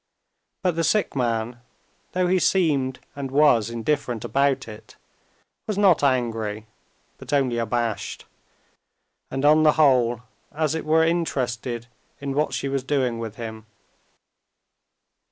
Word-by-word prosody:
But 180 -3 +1
the 165 - 0
sick 210 +1 +1
man, 120 -1 -1 0.5
though 185 0 +1
he 185 +1 +2
seemed 145 -9 +1 0.2
and 140 -1 -4
was 135 -5 +4
indifferent 120 -1 -2
about 140 -1 +1
it, 110 -1 -12 0.7
was 210 -3 -2
not 195 -5 +4
angry, 115 -5 0 0.5
but - - -9
only 130 -5 +1
abashed, 115 -2 -2 1.0
and 135 +1 -2
on 155 +1 +6
the 155 -1 +5
whole 125 -6 +3 0.3
as 155 0 -1
it 160 - -3
were 160 +1 +4
interested 125 -8 -1 0.3
in 140 -1 -4
what 150 +1 0
she 135 +2 -2
was 135 -1 -2
doing 130 -4 0
with 115 -2 -6
him. 110 -2 -8
135 Hz, 130 wpm, -24 LUFS, 115-150 Hz, 1.0 s, on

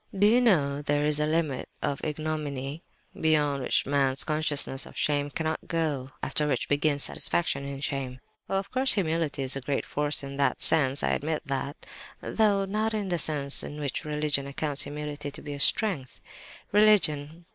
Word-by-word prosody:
"Do 200 - +4
you 235 +4 +5
know 145 - +2
there 145 0 0
is 150 0 +3
a 150 - +1
limit 155 -4 -1
of 140 - -2
ignominy, 150 -2 -4 0.3
beyond 150 -3 +1
which - - 0
man's 135 -1 +1
consciousness 150 -3 -1
of - - -13
shame 145 -1 0
cannot 160 +1 -3
go, 160 -4 -1
and 130 - -12
after 150 - 0
which 135 -4 -1
begins 145 0 +1
satisfaction 140 -5 0
in 140 0 -6
shame? 135 -3 -4 0.3
Well, 195 - 0
of 195 +1 -4
course 260 +1 +4
humility 160 -6 -1
is 130 0 0
a 135 - -4
great 135 +2 -2
force 145 0 0
in 140 0 -7
that 140 - +1
sense, 140 -4 +5
I - - +2
admit 155 +1 -2
that—though 195 +8 -2
not 215 +3 -1
in 205 -3 -3
the 175 -1 0
sense 145 -2 +3
in 150 - -7
which 145 -3 -3
religion 150 -2 -1
accounts 145 0 -2
humility 145 0 -5
to - - -9
be 145 -1 -6
strength! 150 - +2 0.5
"Religion! 170 -7 +3
150 Hz, 175 wpm, -27 LUFS, 140-160 Hz, 0.5 s, you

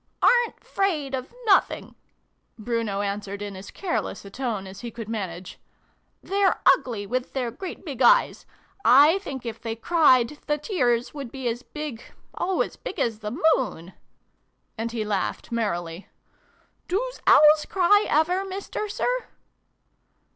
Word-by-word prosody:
" - - -14
Aren't 485 -1 +4
'fraidot 285 -9 -1 0.2
nothing," 400 -3 +2 0.6
Bruno 225 -3 -2
answered 200 0 -4
in 200 -1 -6
as 190 +1 -9
careless 360 - -3
a 200 - -10
tone 230 -5 -3
as 190 0 -10
he 240 - -5
could 230 -1 -8
manage: 190 -5 -5 0.3
" - - -44
they're 395 0 +1 0.2
ugly 235 -7 -6
with 250 +4 -3
their 250 -3 -2
great 375 - -8
big 270 -5 -6
eyes. 240 - +4 0.4
I 290 +9 +6
think 270 -10 -7
if 230 - -6
they 225 -1 -4
cried, 280 0 +3
the 295 - +1
tears 250 - 0
would 275 -5 -7
be 265 -2 -4
as 235 +1 -2
big 295 -5 -7 0.3
oh, 375 +1 0
as - - -3
big - - -7
as 225 -2 0
the 215 +5 -5 0.2
moon! 185 -8 -5 0.4
" - - -47
And 225 +1 -3
he 225 -2 -3
laughed 205 +1 -2
merrily. 175 -6 -3 0.4
" - - -38
Doos - - -2
Owls 300 0 +7
cry 400 +3 +4
ever, 355 +5 +2
Mister 390 +2 -5
Sir - - -1
250 Hz, 155 wpm, -25 LUFS, 215-330 Hz, 0.6 s, Owls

